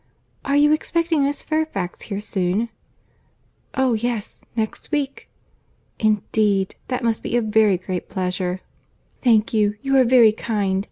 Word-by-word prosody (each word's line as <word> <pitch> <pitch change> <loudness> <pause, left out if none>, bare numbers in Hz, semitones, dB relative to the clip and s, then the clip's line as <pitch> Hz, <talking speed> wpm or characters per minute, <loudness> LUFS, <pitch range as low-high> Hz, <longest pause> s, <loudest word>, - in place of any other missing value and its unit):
"Are 280 - 0
you 295 +1 +5
expecting 330 0 +1
Miss 280 +1 -1
Fairfax 310 - -2
here 200 -1 -5
soon?" 200 +2 -1 1.1
"Oh 265 -2 +2
yes; 230 -1 -3
next 220 -2 -3
week." 285 -3 -2 0.7
"Indeed!—that 215 +2 0
must 230 -2 0
be 240 - -1
a - - +2
very 215 -3 +3
great 185 0 -5
pleasure." 185 -1 -2 0.6
"Thank 225 -4 +3
you. 210 -1 +2
You 270 0 +1
are 260 - +7
very 240 -3 +6
kind. 205 -3 -1
220 Hz, 130 wpm, -22 LUFS, 200-265 Hz, 1.1 s, are